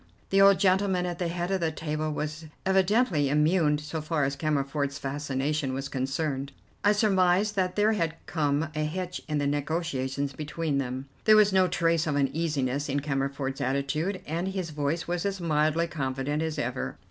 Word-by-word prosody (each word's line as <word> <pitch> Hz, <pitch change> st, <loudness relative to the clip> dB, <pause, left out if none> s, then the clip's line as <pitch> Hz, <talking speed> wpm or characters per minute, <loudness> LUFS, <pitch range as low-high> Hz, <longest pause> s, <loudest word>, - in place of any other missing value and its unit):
The 195 Hz, 0 st, +5 dB
old 195 Hz, 0 st, +7 dB
gentleman 190 Hz, -1 st, +2 dB
at 175 Hz, -1 st, -4 dB
the 175 Hz, -, 0 dB
head 175 Hz, +2 st, -2 dB
of 190 Hz, -, +1 dB
the 160 Hz, -1 st, +1 dB
table 155 Hz, 0 st, -3 dB
was 155 Hz, +2 st, -4 dB, 0.2 s
evidently 190 Hz, -, +3 dB
immune 150 Hz, +1 st, +3 dB
so 150 Hz, +2 st, -5 dB
far 155 Hz, -1 st, 0 dB
as 135 Hz, +1 st, 0 dB
Cammerford's 140 Hz, -1 st, -1 dB
fascination 140 Hz, 0 st, -2 dB
was 135 Hz, +1 st, -4 dB
concerned. 135 Hz, +1 st, -2 dB, 0.3 s
I 205 Hz, -, +5 dB
surmised 200 Hz, -1 st, +3 dB
that 185 Hz, -2 st, 0 dB
there 210 Hz, +1 st, +3 dB
had 165 Hz, -6 st, -1 dB
come 150 Hz, -1 st, 0 dB
a 155 Hz, -, -3 dB
hitch 180 Hz, +4 st, -3 dB
in 150 Hz, -2 st, -1 dB
the 145 Hz, -, 0 dB
negotiations 140 Hz, -2 st, -1 dB
between 150 Hz, 0 st, -2 dB
them. 130 Hz, 0 st, -3 dB, 0.2 s
There 215 Hz, -, +7 dB
was 210 Hz, -2 st, +5 dB
no 185 Hz, -1 st, +5 dB
trace 165 Hz, -2 st, +1 dB
of 150 Hz, -, 0 dB
uneasiness 145 Hz, -1 st, 0 dB
in 140 Hz, +1 st, 0 dB
Cammerford's 135 Hz, -1 st, -2 dB
attitude, 140 Hz, +8 st, -1 dB
and 170 Hz, +4 st, -2 dB
his 190 Hz, -4 st, -3 dB
voice 150 Hz, +3 st, -2 dB
was 175 Hz, 0 st, -1 dB
as 195 Hz, -1 st, -2 dB
mildly 155 Hz, 0 st, +2 dB
confident 145 Hz, -1 st, -2 dB
as 160 Hz, -1 st, -2 dB
ever. 125 Hz, -1 st, -3 dB
155 Hz, 175 wpm, -27 LUFS, 140-180 Hz, 0.3 s, old